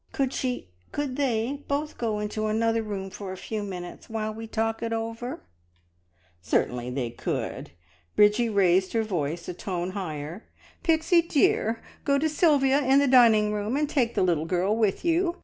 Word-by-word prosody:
Could 270 -1 0
she 250 - -3 0.2
could 285 -3 -2
they 265 0 -1
both 295 +2 -2
go 225 -3 -1
into 210 +1 -2
another 225 +1 +1
room 195 -3 -5
for 195 -1 -7
a 190 - -6
few 215 +3 -4
minutes, 180 -3 -7
while 215 -1 -3
we 225 +1 -7
talk 225 0 -1
it 230 -1 -2
over 225 +1 -3
together?" - - -7 1.0
"Certainly 120 +9 0
they 125 -2 -3
could!" - - -4 0.5
Bridgie 210 +3 +4
raised 190 -2 +3
her 225 -1 +2
voice 170 -5 -3
a 180 - -3
tone 180 0 -3
higher. 170 -1 -6 0.3
"Pixie 330 +1 +3
dear, 245 -8 +1 0.2
go 280 -1 +2
to 310 +3 +1
Sylvia 290 -4 +3
in 265 +1 +4
the 280 0 +4
dining 225 -5 +5
room 210 +5 -1
and 300 0 +1
take 255 -6 0
the - - +2
little 165 -4 +1
girl 185 +5 +1
with 220 - 0
you. 340 +1 +2
220 Hz, 175 wpm, -26 LUFS, 190-265 Hz, 1.0 s, dining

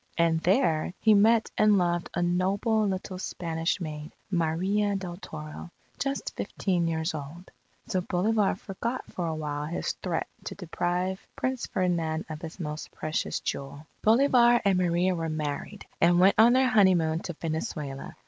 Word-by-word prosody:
And 165 -1 +3
there, 175 - +1
he 220 - +4
met 220 +2 +4
and 210 -1 +5
loved 175 -1 0
a 175 - +1
noble, 200 +5 +1
little 185 -1 -4
Spanish 165 -2 -2
maid, 155 -2 -6 0.2
Maria 190 +5 +1
del 180 -3 -5
Toro, 155 -2 -8 0.3
just 275 0 -2
fifteen 180 -4 -1
years 160 0 -1
old. 155 +5 -8 0.3
So 190 -5 -1
Bolivar 200 +4 +1
forgot 230 +6 -4
for 175 -2 -3
a 160 - -2
while 150 -1 -3
his 170 - -2
threat 175 -3 -3 0.2
to - - -5
deprive 180 +1 -2
Prince 255 -1 -2
Ferdinand 170 -4 -1
of 155 0 -6
his 165 +3 -8
most 150 -2 -5
precious 155 0 -3
jewel. 140 +2 -5 0.2
Bolivar 240 +1 +5
and 190 -2 +3
Maria 180 +1 +2
were 165 -2 -2
married, 155 +6 -4 0.2
and 175 +1 +5
went 190 +2 +6
on 235 +2 +7
their 260 0 +4
honeymoon 180 -8 +4
to 175 0 -6
Venezuela. 155 -4 -4
175 Hz, 155 wpm, -28 LUFS, 160-200 Hz, 0.3 s, on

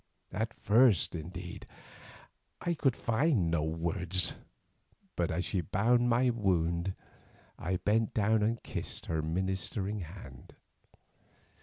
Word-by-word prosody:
At 110 +4 -2
first, 110 -4 +4
indeed, 85 +2 -7 0.9
I 175 - 0
could 135 -6 +1
find 115 - +1
no 85 -2 +2
words, 85 +3 -1 0.8
but 85 -2 0
as 90 +3 -1
she 95 - 0
bound 120 +8 +2
my 125 +1 +3
wound, 90 -4 0 0.6
I 90 +3 -1
bent 110 +3 +1
down 110 +1 +3
and 115 +2 0
kissed - - -5
her 80 -1 -1
ministering 95 +5 -2
hand. 80 -8 -10
95 Hz, 115 wpm, -31 LUFS, 85-110 Hz, 0.9 s, first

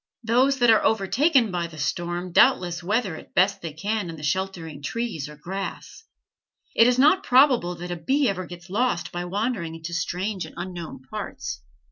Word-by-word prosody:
Those 255 +5 +3
that 240 -2 +5
are 220 - +4
overtaken 230 - +3
by 175 -2 -2
the 160 -2 -13
storm 175 +3 -2
doubtless 175 0 +4
weather 200 -1 0
it - - -11
as - - -39
best 195 +2 +3
they 165 - -5
can 200 +3 -2
in 165 - -6
the 150 - -11
sheltering 165 -2 -3
trees 190 - -3
or 150 - -10
grass. 195 - -6 0.7
It 230 - +6
is 250 0 +3
not 305 +8 +5
probable 250 -9 +4
that 175 +1 -7
a - - -1
bee 270 - +1
ever 185 -3 -2
gets 175 +1 -11
lost 225 -4 0
by 175 0 -4
wandering 195 -3 -2
into 165 +1 -7
strange 185 +3 -2
and - - -15
unknown 170 -8 -7
parts. - - -6
185 Hz, 185 wpm, -24 LUFS, 170-230 Hz, 0.7 s, It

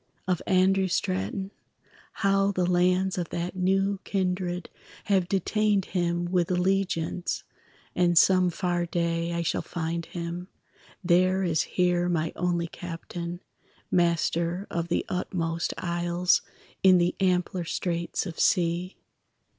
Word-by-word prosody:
of 180 -2 0
Andrew 190 +1 +3
Straton; 105 - -2 0.7
How 195 0 +3
the 185 -2 0
lands 180 +1 +2
of 175 - -3
that 175 +2 -3
new 195 +2 +1
kindred 180 -2 -2 0.4
Have 190 -3 +1
detained 205 +1 +1
him 175 -1 0
with 175 -1 +1
allegiance, 180 -2 0 0.5
And 175 -1 +3
some 185 0 +5
far 175 0 -1
day 170 0 -1
I 170 0 -1
shall 160 - 0
find 170 0 -4
him, 175 +1 -5 0.6
There 185 +2 +3
as 160 -5 +2 0.2
here 180 -1 +2
my 165 -2 0
only 175 -1 0
captain, 170 +1 -6 0.5
Master 170 +1 +1
of 170 0 -2
the 170 - 0
utmost 170 -2 -2
isles 175 0 +1 0.4
In 185 -1 +7
the 175 0 +2
ampler 180 -1 +1
straits 170 +2 -2
of 170 -4 -7
sea. 175 0 +1
180 Hz, 125 wpm, -27 LUFS, 170-185 Hz, 0.7 s, In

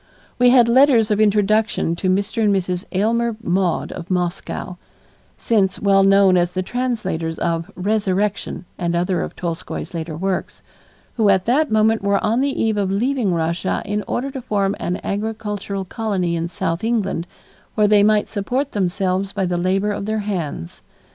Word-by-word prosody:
We 250 0 +6
had 245 -2 +6
letters 235 -3 +5
of 210 +1 +2
introduction 210 -4 +2
to 185 - -1
Mr. 200 +4 0
and 210 - +3
Mrs. 180 -1 -2
Aylmer 225 +3 0
Maude 180 -2 0
of 180 -1 -8
Moscow, 180 0 -3 0.6
since 200 -5 +1
well 195 -1 +4
known 195 -1 +5
as 175 0 +1
the 185 - 0
translators 190 -9 -2
of 165 +1 -2
"Resurrection" 200 -1 -1
and 170 -1 -1
other 180 +1 0
of - - -5
Tolstoy's 170 0 -5
later 160 -2 -5
works, 190 +2 -3 0.5
who 215 -3 +3
at 190 -2 +3
that 290 +6 +2
moment 220 +1 +3
were 200 0 +1
on 230 +4 +2
the 275 0 -1
eve 220 -2 +1
of 200 -2 0
leaving 230 +1 0
Russia 170 +2 -1
in 210 0 -2
order 275 +3 -2
to 265 -1 -6
form 200 -4 0
an 180 - -2
agricultural 205 -2 -3
colony 185 -5 -2
in 165 0 -2
South 165 0 -3
England 205 -7 -1 0.5
where 210 -1 +4
they 205 0 +5
might 210 0 +3
support 250 +7 -2
themselves 190 0 -1
by 195 -2 -1
the 175 0 -1
labor 190 +4 +1
of 200 0 -4
their 215 0 -1
hands. 160 - -4
200 Hz, 165 wpm, -20 LUFS, 180-220 Hz, 0.6 s, We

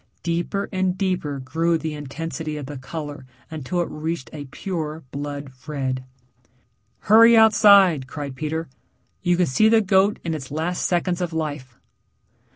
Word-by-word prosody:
Deeper 175 +4 -1
and 185 -1 0
deeper 180 -7 -1
grew 165 +6 0
the 160 0 -4
intensity 155 +2 -5
of 145 - -6
the 145 +2 -7
color 145 +2 -7 0.3
until 160 +3 -2
it 170 - -3
reached 160 -2 -4
a 145 -2 -6
pure 160 +1 -5
blood 145 -1 -5 0.2
red. 130 -3 -2 1.0
"Hurry 230 +2 +7
outside," 200 -9 +6
cried 140 -1 -6
Peter. 155 +3 -3 0.5
"You 175 -2 +2
can 180 - +3
see 215 +10 +3
the 225 0 +5
goat 200 0 +3
in 165 - -2
its 135 -5 -6
last 160 +4 -1
seconds 175 0 0
of 175 -2 -2
life." 145 -6 -4
160 Hz, 150 wpm, -23 LUFS, 145-180 Hz, 1.0 s, Hurry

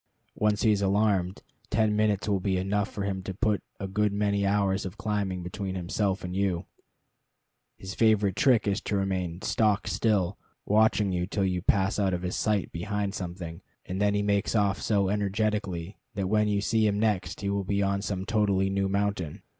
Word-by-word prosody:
Once 105 -1 +1
he 110 - +5
is 100 -1 +1
alarmed, 100 -2 +1 0.3
ten 105 0 +2
minutes 105 -2 +1
will 100 -2 +1
be 95 0 0
enough 100 +2 0
for 100 - -5
him 95 -1 -2
to 95 0 -6
put 105 -1 +1 0.2
a 95 - -3
good 105 +2 +1
many 100 -1 +1
hours 100 -1 +1
of 95 +2 -7
climbing 100 -4 -2
between 95 +2 -4
himself 95 +2 -1
and 90 0 -4
you. 95 -2 0 1.1
His 95 0 -7
favorite 105 -4 +3
trick 125 -4 +3
is 100 0 0
to 105 - -2
remain 95 -2 -2
stock 105 -2 +1
still, 100 -4 +1 0.3
watching 105 -1 +3
you 90 -1 -1
till 100 0 0
you 90 -1 0
pass 95 +2 +1
out 95 -3 +2
of 90 - -5
his 90 - -2
sight 105 -3 0
behind 100 +3 -2
something, 85 -3 -6 0.2
and 95 +2 -4
then 105 0 +3
he 105 - +1
makes 100 +2 +1
off 100 -2 +2
so 100 -3 +2
energetically 100 -2 -1 0.2
that 100 - -1
when 105 +2 +2
you 100 -1 +1
see 110 +1 +2
him 100 0 0
next 100 -5 0
he 100 - -1
will 100 0 -1
be 100 +1 0
on 100 0 0
some 95 -2 -3
totally 100 -3 +1
new 95 0 0
mountain. 100 -5 -2
100 Hz, 195 wpm, -28 LUFS, 95-105 Hz, 1.1 s, he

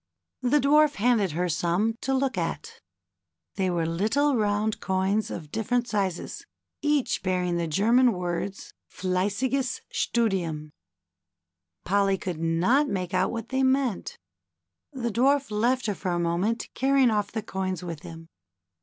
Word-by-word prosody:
The 255 +4 +3
Dwarf 295 +1 +4
handed 210 -5 +2
her 180 +3 0
some 175 +6 +1
to 270 - -2
look 265 -2 +1
at. 170 -2 -4 0.7
They 190 -1 0
were 170 -2 0
little 220 - +1
round 210 -1 0
coins 190 +3 0
of 150 -3 -7
different 240 +2 0
sizes, 195 -6 -2 0.4
each 295 -4 +1
bearing 180 -2 0
the 170 -1 -1
German 230 +10 +4
words, 180 +2 -4
" - - -60
Fleissiges 205 +8 -1
Studiiini" 175 -10 -1 1.1
Polly 195 +1 +2
could 180 -4 -5
not 175 - +2
make 185 -1 -3
out 185 +1 +2
what 230 -2 -5
they 265 0 0
meant. 260 -4 0 0.7
The 240 -4 -3
Dwarf 275 +3 +2
left 245 +5 +1
her 210 - 0
for 185 - -4
a 175 -1 0
moment 175 +7 -1
carrying 270 -2 +3
off 210 -2 0
the 220 -1 -3
coins 185 -2 -3
with 170 -3 -5
him. 165 -1 -10
205 Hz, 145 wpm, -26 LUFS, 180-245 Hz, 1.1 s, Dwarf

